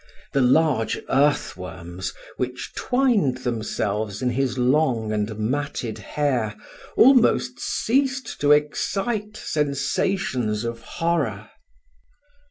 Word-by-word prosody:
The 140 - +3
large 130 -2 +3
earth 145 +2 +2
worms, 90 0 -6 0.3
which 125 0 -4
twined 240 - +2
themselves 110 -2 -2
in 125 - +2
his 130 0 -1
long 125 -4 +2
and 105 0 -2
matted 125 0 -2
hair, 125 -8 -1 0.4
almost 255 -1 +5
ceased 265 0 0
to 145 0 +4
excite 200 +8 0
sensations 135 - -1
of 115 0 -4
horror. 135 -9 -2
130 Hz, 95 wpm, -23 LUFS, 110-160 Hz, 0.4 s, almost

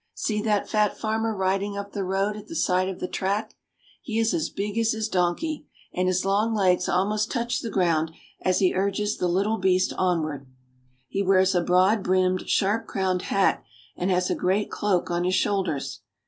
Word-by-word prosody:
See 210 -1 -1
that 210 -1 0
fat 210 -2 +1
farmer 225 0 -1
riding 195 +1 -1
up 200 0 -6
the 200 - -3
road 195 +2 0
at 210 0 -10
the 330 - -8
side 185 - +1
of 190 - -6
the 180 - -3
track! 200 +4 -2 0.5
He 225 -2 -4
is 225 0 +2
as 325 -2 -1
big 205 +1 -4
as 225 0 +2
his 220 -1 -2
donkey, 220 - -1 0.3
and 185 0 0
his 185 0 +1
long 210 +3 +1
legs 185 -3 +2
almost 210 +4 +1
touch 235 -1 -1
the 230 - -4
ground 165 -5 +1 0.3
as 185 -1 +2
he 185 -2 +3
urges 200 +2 0
the 180 - 0
little 200 +5 +1
beast 185 0 +2
onward. 155 -7 -1 0.6
He 195 - -2
wears 190 0 +3
a 175 - +2
broad 185 +5 +3
brimmed, 185 0 +1
sharp 215 +3 +1
crowned 185 -2 -1
hat, 195 +1 +1 0.3
and 180 - -2
has 180 -1 +1
a - - +1
great 195 +3 0
cloak 190 -4 0
on 175 0 0
his 185 +1 +1
shoulders. 190 -8 -1
195 Hz, 190 wpm, -25 LUFS, 185-210 Hz, 0.6 s, he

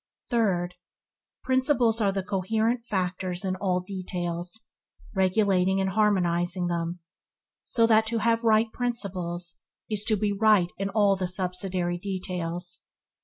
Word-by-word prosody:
Third. 185 -7 +1 0.7
Principles 255 -3 +2
are 200 -2 +3
the 195 -1 -2
coherent 220 +5 0
factors 185 -1 -2
in 185 -1 0
all 185 -2 0
details, 180 0 -4 0.5
regulating 190 -1 +2
and 190 0 0
harmonizing 180 -3 +1
them, 170 0 -2 0.6
so 230 - +2
that 220 -1 +4
to 230 +1 -1
have 230 +1 +1
right 220 0 +3
principles 180 -8 -3 0.3
is 210 -1 0
to 220 - +4
be 205 0 0
right 200 -4 +4
in 195 0 -1
all 200 -1 +3
the 185 -1 -2
subsidiary 180 -1 -1
details. 180 -2 -4
190 Hz, 125 wpm, -27 LUFS, 180-220 Hz, 0.7 s, that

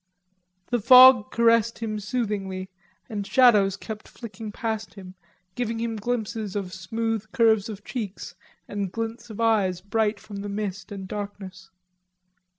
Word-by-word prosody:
The 240 - +2
fog 255 0 +8
caressed 230 -1 +3
him 215 -2 -3
soothingly 200 -4 -3 0.4
and 205 -2 -5
shadows 210 -7 +5
kept 215 +1 -8
flicking 220 -2 -9
past 220 0 -4
him, 185 -2 -10 0.4
giving 230 0 -3
him 230 0 -2
glimpses 220 -2 -3
of 190 -3 -4
smooth 220 +3 -3
curves 220 -3 +3
of 205 -1 -8
cheeks 215 -6 -6 0.3
and 200 -3 -3
glints 225 +2 -5
of 215 - -9
eyes 205 -6 +2
bright 210 +2 -1
from 205 -1 -10
the 200 +1 -5
mist 200 0 -5
and 195 -2 -7
darkness. 195 -2 -7
215 Hz, 140 wpm, -25 LUFS, 200-230 Hz, 0.4 s, fog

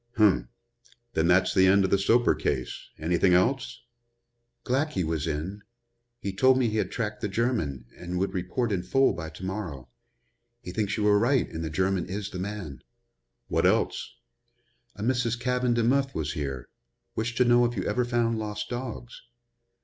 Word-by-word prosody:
"Um! 90 - +4 0.6
Then 80 +1 +2
that's 90 +1 +4
the 95 0 +5
end 100 +1 +5
of 95 - -2
the 100 - +4
Soper 120 +5 +4
case. 65 - -3
Anything 90 +3 +3
else?" 125 +5 0 0.8
"Glackey 130 - 0
was 80 -1 -2
in. 80 +7 -3 0.6
He 100 -5 -4
told 130 +6 +4
me 125 -2 +2
he 110 - -2
had - - 0
tracked 105 -3 -3
the 105 - 0
German 100 - -1
and 90 0 -5
would 95 +1 -1
report 100 +6 -1
in 95 -3 0
full 135 +10 +3
by 80 -1 -6
to 80 +4 -9
morrow. 85 - -5 0.7
He 90 - -6
thinks 105 +2 -1
you 105 - 0
were 105 0 +5
right 125 +3 +2
and 80 - -4
the 80 - -3
German 95 +3 0
is 100 +2 -4
the 90 - -5
man." 95 -9 -5 0.7
"What - - +2
else?" - - 0 0.8
"A 105 - -6
Mrs. 120 -1 0
Caven 125 -1 +1
Demuth 135 +4 +1
was 80 -1 -2
here. 70 -4 -4 0.5
Wished 115 +2 -2
to 125 - +4
know 120 0 +5
if 120 -1 -2
you 95 - -1
ever 125 - 0
found 120 -2 0
lost 105 -1 -4
dogs." 120 -1 -6
105 Hz, 175 wpm, -27 LUFS, 90-120 Hz, 0.8 s, the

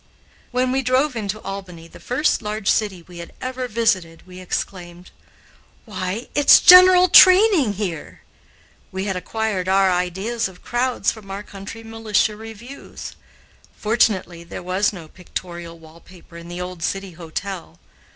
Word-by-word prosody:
When 250 +1 0
we 265 +1 +1
drove 260 +2 +1
into 215 -1 -4
Albany, 180 -4 -8
the - - -15
first 255 +3 0
large 210 -1 -5
city 195 -5 -1
we 175 0 -13
had 170 - -10
ever 255 0 -4
visited, 190 -8 -1
we 185 0 -12
exclaimed, 180 -1 -6 0.7
"Why, 195 +1 -5
it's 290 -1 +7
general 365 0 +8
training, 370 - +6
here!" 185 -6 -6 0.7
We 190 +1 -4
had 195 -2 -2
acquired 195 -1 -3
our 190 0 +3
ideas 190 +6 -2
of 185 -1 -16
crowds 240 -3 0
from 215 -3 -13
our 195 +2 -6
country 205 +3 -10
militia 225 -1 -1
reviews. 225 +5 -10 0.6
Fortunately, 205 -6 0
there 170 - -9
was 185 +3 0
no 175 -6 -10
pictorial 175 -1 -8
wall 160 0 -16
paper 175 -1 -18
in 170 0 -10
the 175 +1 -7
old 180 -1 -7
City 195 +2 -3
Hotel. 170 - -7
195 Hz, 145 wpm, -21 LUFS, 180-230 Hz, 0.7 s, general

